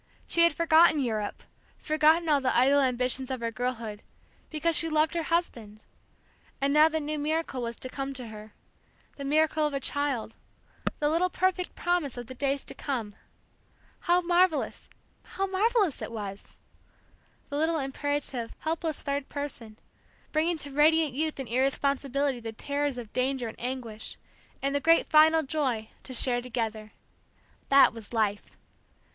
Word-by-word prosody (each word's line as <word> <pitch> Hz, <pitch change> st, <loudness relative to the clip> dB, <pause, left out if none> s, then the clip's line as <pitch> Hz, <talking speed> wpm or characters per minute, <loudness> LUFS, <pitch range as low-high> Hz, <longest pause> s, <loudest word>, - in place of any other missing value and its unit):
She 340 Hz, -, +1 dB
had 335 Hz, 0 st, +6 dB
forgotten 330 Hz, -1 st, +5 dB
Europe, 220 Hz, -6 st, -2 dB, 0.3 s
forgotten 315 Hz, +2 st, +3 dB
all 290 Hz, -3 st, +3 dB
the 255 Hz, -2 st, +1 dB
idle 275 Hz, +3 st, +5 dB
ambitions 255 Hz, 0 st, +1 dB
of 260 Hz, -1 st, -3 dB
her 230 Hz, 0 st, -2 dB
girlhood, 230 Hz, -3 st, -4 dB, 0.5 s
because 320 Hz, +1 st, 0 dB
she 330 Hz, -, +3 dB
loved 310 Hz, 0 st, +2 dB
her 340 Hz, -, -1 dB
husband; 235 Hz, -11 st, -2 dB, 0.8 s
and 275 Hz, +1 st, +1 dB
now 305 Hz, +1 st, +6 dB
the 320 Hz, 0 st, -1 dB
new 300 Hz, 0 st, -3 dB
miracle 305 Hz, -3 st, -2 dB
was 235 Hz, 0 st, -4 dB
to 255 Hz, -, -6 dB
come 275 Hz, +1 st, -4 dB
to 250 Hz, -3 st, -6 dB
her, 215 Hz, 0 st, -11 dB, 0.6 s
the 280 Hz, -, -6 dB
miracle 310 Hz, +2 st, +2 dB
of 290 Hz, -, -4 dB
a -, -, 0 dB
child, 275 Hz, -6 st, -1 dB, 0.6 s
the 295 Hz, -, 0 dB
little 335 Hz, +4 st, +2 dB
perfect 365 Hz, 0 st, -1 dB
promise 345 Hz, -7 st, -1 dB
of 240 Hz, -, -5 dB
the 260 Hz, -, -9 dB
days 275 Hz, +1 st, 0 dB
to -, -, -7 dB
come. 235 Hz, -7 st, -4 dB, 0.9 s
How 355 Hz, 0 st, +2 dB
marvellous 350 Hz, -2 st, +1 dB, 0.3 s
how 390 Hz, -, -3 dB
marvellous 395 Hz, -, +1 dB
it -, -, -5 dB
was! 205 Hz, -3 st, -7 dB, 0.9 s
The 285 Hz, -, -3 dB
little 320 Hz, +1 st, +1 dB
imperative, 275 Hz, -3 st, -2 dB
helpless 320 Hz, 0 st, -3 dB
third 280 Hz, -1 st, -2 dB
person, 255 Hz, -7 st, -6 dB, 0.5 s
bringing 325 Hz, +2 st, +1 dB
to 290 Hz, -2 st, -6 dB
radiant 305 Hz, 0 st, +3 dB
youth 310 Hz, +2 st, -2 dB
and 265 Hz, -, -4 dB
irresponsibility 275 Hz, +1 st, 0 dB
the 225 Hz, -1 st, -6 dB
terrors 285 Hz, +2 st, -2 dB
of 235 Hz, -3 st, -8 dB
danger 255 Hz, -1 st, 0 dB
and 220 Hz, -, -9 dB
anguish, 240 Hz, -4 st, -5 dB, 0.5 s
and 275 Hz, 0 st, 0 dB
the 285 Hz, -, +1 dB
great 330 Hz, +3 st, +4 dB
final 315 Hz, +1 st, +5 dB
joy, 265 Hz, -7 st, -2 dB
to -, -, -10 dB
share 245 Hz, 0 st, +2 dB
together. 225 Hz, -3 st, -4 dB, 0.8 s
That 275 Hz, -4 st, +6 dB
was 225 Hz, -3 st, -9 dB
life. 210 Hz, -3 st, -1 dB
280 Hz, 155 wpm, -28 LUFS, 245-315 Hz, 0.9 s, had